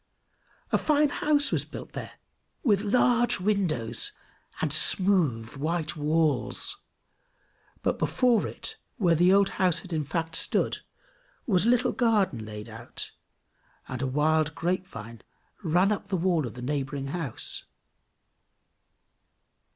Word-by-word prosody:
A - - +3
fine 300 -1 +3
house 290 0 +2
was - - +1
built - - -9
there, - - -6 0.5
with 205 -6 +3
large 240 +2 +3
windows, 175 - 0 0.5
and 150 -3 +1
smooth 155 - +3
white 160 +2 -1
walls; 155 - 0 1.1
but - - 0
before 245 -4 +2
it, - - -6 0.2
where 180 -7 +3
the 175 +3 +4
old 200 0 +5
house 180 -3 +2
had 185 -3 -9
in 155 -1 0
fact 165 +3 -3
stood, - - +1 0.7
was 190 -3 +3
a - - +4
little 245 0 +3
garden 205 - +1
laid 105 0 -8
out, 115 +1 -6 0.8
and 130 -1 -5
a 135 - 0
wild 150 +2 +1
grapevine 155 - -4 0.4
ran 180 +5 +3
up 200 -1 -2
the 195 -2 -1
wall 170 -5 +1
of 115 - -9
the 125 - -8
neighboring 135 0 -3
house. 155 -6 -4
165 Hz, 130 wpm, -27 LUFS, 140-200 Hz, 1.1 s, old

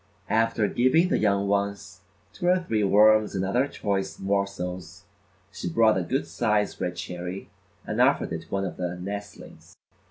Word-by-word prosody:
After 115 -1 +2
giving 160 - +3
the - - +1
young 100 -1 +1
ones 100 -2 -2 0.3
two 175 - -3
or 180 +1 +5
three 115 - -1
worms 105 +1 +4
and 95 0 -1
other 125 +8 +1
choice 100 -7 -3
morsels, 95 -3 -3 0.5
she 90 - -5
brought 110 +4 +4
a - - -1
good 130 +11 -1
size 105 -3 -1
red 90 - -2
cherry 90 +2 -6 0.3
and - - -1
offered - - +2
it 80 - -4
to 80 - -18
one 95 0 -1
of 90 - -6
the 90 -1 -3
nestlings. 100 +2 -8
100 Hz, 165 wpm, -26 LUFS, 95-110 Hz, 0.5 s, or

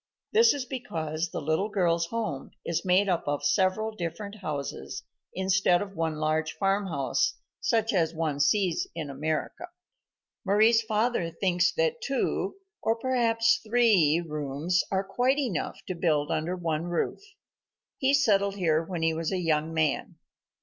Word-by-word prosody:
This 455 -2 +6
is 275 -3 -4
because 165 - -3
the - - -4
little 160 +7 0
girl's 170 -4 +1
home 215 -10 -4 0.2
is 170 - -1
made 190 +2 +3
up 175 -5 0
of 145 0 -1
several 190 +8 +2
different 200 +4 -5
houses, 150 -8 -5 0.3
instead 190 -1 +3
of 195 0 -6
one 160 -1 -1
large 155 +1 0
farmhouse, 195 - 0 0.2
such 225 -1 +1
as 165 -4 +2
one 160 -3 -2
sees 180 +3 +2
in 155 -4 -4
America. 155 - -3 0.8
Mari's 220 +3 +4
father 220 -4 0
thinks 175 +1 +1
that 485 -1 0
two, 480 - -1 0.3
or 225 - +1
perhaps 230 -2 +2
three, 215 -9 +4
rooms 150 +4 -1
are 190 0 0
quite 250 +7 +1
enough 245 - -2
to 185 - -3
build 155 -4 0
under 165 +4 -1
one 165 -2 -2
roof. 175 - -2 0.8
He 275 -1 +3
settled 200 -7 +2
here 165 -5 +2
when 170 -1 -4
he 165 0 +2
was 160 0 -2
a 190 - 0
young 160 -2 0
man. 155 -3 0
180 Hz, 150 wpm, -27 LUFS, 160-215 Hz, 0.8 s, This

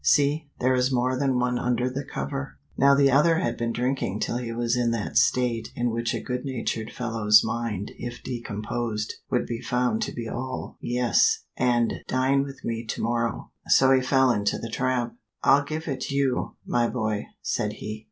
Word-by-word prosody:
See 145 - +3
there 130 +1 +3
is 130 +1 +2
more 130 0 +1
than 135 -1 +1
one 125 0 +1
under 125 0 0
the 130 +2 -3
cover." 135 0 -5 0.2
Now 140 +1 +5
the 140 -1 +4
other 150 +5 +5
had 180 - 0
been 115 0 -2
drinking 125 -4 -1
till 120 - -1
he 120 -2 -4
was 120 +1 0
in 120 -1 +1
that 115 -3 -2
state 120 -3 +2
in 120 0 0
which 115 +1 -1
a - - -2
good 125 -1 -3
natured 115 -4 -3
fellow's 110 -3 +4
mind 110 -3 -3
if 120 0 -6
decomposed 110 -2 -3 0.2
would 125 - +1
be 120 0 -4
found 125 - 0
to 215 - -1
be 115 -1 -5
all 130 +2 -5
"Yes," 120 -1 +2
and 120 -2 +1
"Dine 130 +2 +2
with 135 -1 -7
me 115 0 -2
to - - -3
morrow," 115 -1 -1 0.2
so 135 0 +5
he 130 -1 +5
fell 130 0 +3
into 105 -3 0
the 115 - -6
trap. 125 0 0 0.3
"I'll 140 +1 +5
give 155 +3 -5
it 130 -3 -3
you, 140 -2 0
my 120 -1 +1
boy," 110 -1 -2 0.2
said 105 0 -1
he. 110 0 -6
125 Hz, 190 wpm, -26 LUFS, 115-130 Hz, 0.3 s, Now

